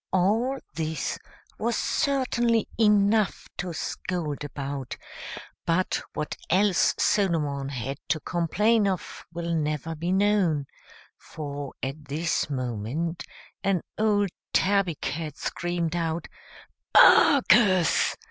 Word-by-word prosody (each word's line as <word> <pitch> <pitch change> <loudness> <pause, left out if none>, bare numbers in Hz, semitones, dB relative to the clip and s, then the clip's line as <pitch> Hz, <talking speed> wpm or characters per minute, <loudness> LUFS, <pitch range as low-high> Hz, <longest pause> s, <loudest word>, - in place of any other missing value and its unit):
All 220 +9 +2 0.2
this 160 -2 -3 0.4
was 235 +1 0
certainly 240 -5 +1
enough 210 -1 +3
to 180 0 -3
scold 160 -1 -4
about; 140 -2 -5 0.7
but 170 +2 0
what 150 - -3
else 190 +1 +3
Solomon 150 -9 +1
had 135 +1 -4
to 155 - +1
complain 205 +7 +1
of 185 -5 -4
will 170 0 -3
never 155 0 -1
be 170 +3 -3
known, 190 -7 +2 0.5
for, 145 -3 -7
at 140 +3 -4
this 155 +3 -1
moment, 130 +6 -3 0.4
an 195 -3 +1
old 205 -2 +2 0.2
tabby 195 -4 +2
cat 155 0 -4
screamed 175 -1 -2
out, 165 -1 -2 0.7
"Barkers!" 210 - +6
170 Hz, 100 wpm, -26 LUFS, 150-200 Hz, 0.7 s, Barkers